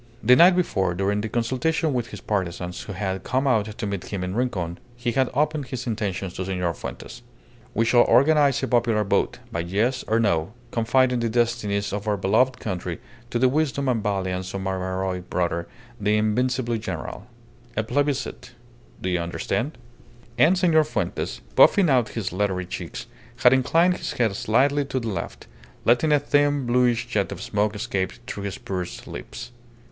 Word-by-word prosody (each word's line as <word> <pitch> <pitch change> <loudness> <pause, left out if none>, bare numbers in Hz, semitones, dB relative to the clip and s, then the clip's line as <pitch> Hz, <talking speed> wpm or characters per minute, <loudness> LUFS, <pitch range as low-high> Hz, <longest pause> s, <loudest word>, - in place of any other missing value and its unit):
The 125 +3 +7
night 175 +5 +7
before, 95 - 0
during 100 +2 0
the 110 - -3
consultation 130 +7 0
with 120 -2 -1
his - - -9
partisans, 90 -3 -3
who 100 - -7
had 95 0 -3
come 130 +2 0
out 115 -6 +3
to 115 - -3
meet 100 -3 -3
him 100 -3 -4
in 90 0 -3
Rincon, 95 -8 -2 0.2
he 120 0 -2
had 130 +1 +1
opened 150 -1 0
his 125 -1 -5
intentions 100 -5 -3
to 95 - -4
Senor 90 -2 -1
Fuentes - - -8 0.5
"We 115 - +2
shall 120 +1 +5
organize 140 0 +4
a - - +1
popular 115 -3 +2
vote, 100 - 0
by 85 - -2
yes 105 +10 0
or 110 +1 +2
no, 100 -4 +1 0.2
confiding 125 +2 +2
the 115 -1 0
destinies 110 -4 0
of 105 +1 -4
our 105 -1 +1
beloved 110 +7 +2
country 95 -5 -4 0.3
to 120 - -1
the 130 +2 +4
wisdom 140 0 0
and 120 -4 +1
valiance 95 -2 -2
of 95 - -3
my 95 0 -2
heroic 95 -1 -3
brother, 85 -1 -1 0.3
the 105 +1 +2
invincible 120 +2 0
general. 100 +1 -6 0.5
A 110 - +2
plebiscite. 140 +1 -2 0.5
Do 95 - -2
you 90 -1 +1
understand?" 85 - -2 0.6
And 155 +10 +4
Senor 165 -4 +4
Fuentes, 155 - -3
puffing 190 -7 +6
out 125 -4 +3
his 100 -5 -2
leathery 95 -1 -1
cheeks, 90 - -6 0.4
had 125 - +8
inclined 165 +7 +3
his - - -4
head 110 -5 +1
slightly 135 +8 +2
to 135 -1 -2
the 115 -2 -4
left, 100 - -5 0.4
letting 125 +7 +4
a 150 - +5
thin, 145 -1 +2
bluish 120 0 +2
jet 105 -5 -1
of - - -6
smoke 105 +1 -1
escape 100 -4 -2
through 100 -5 -5
his 100 - -4
pursed 90 -2 -5
lips. - - -8
115 Hz, 175 wpm, -24 LUFS, 95-130 Hz, 0.6 s, had